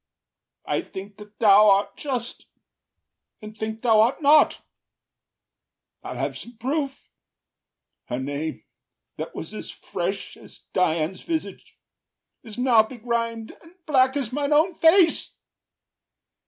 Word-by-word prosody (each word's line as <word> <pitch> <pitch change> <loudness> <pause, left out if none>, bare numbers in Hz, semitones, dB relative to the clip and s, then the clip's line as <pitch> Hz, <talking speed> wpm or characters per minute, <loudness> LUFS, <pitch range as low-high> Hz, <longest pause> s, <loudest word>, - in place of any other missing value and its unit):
I - - -1
think 195 +1 -10
that 210 0 -14
thou 210 -1 +6
art 200 0 +2
just, 250 -5 -5 0.9
and 215 0 -10
think 220 +1 -5
thou 220 -3 +5
art 235 +4 +2
not. 300 0 +4 1.4
I’ll - - -6
have - - -2
some 240 -1 -11
proof: 275 +3 -3 1.0
her 125 - -4
name, 145 +4 -4 0.5
that - - -6
was - - -7
as - - -7
fresh - - -5
As - - -15
Dian’s 170 0 0
visage, 325 -2 -5 0.6
is 220 -1 -11
now 245 -3 +5
begrim’d 230 -1 -3
and 330 +2 -19
black 265 -2 +3
As 255 -4 -3
mine 290 +1 0
own 320 +5 +3
face. 335 0 +4
230 Hz, 120 wpm, -24 LUFS, 210-280 Hz, 1.4 s, thou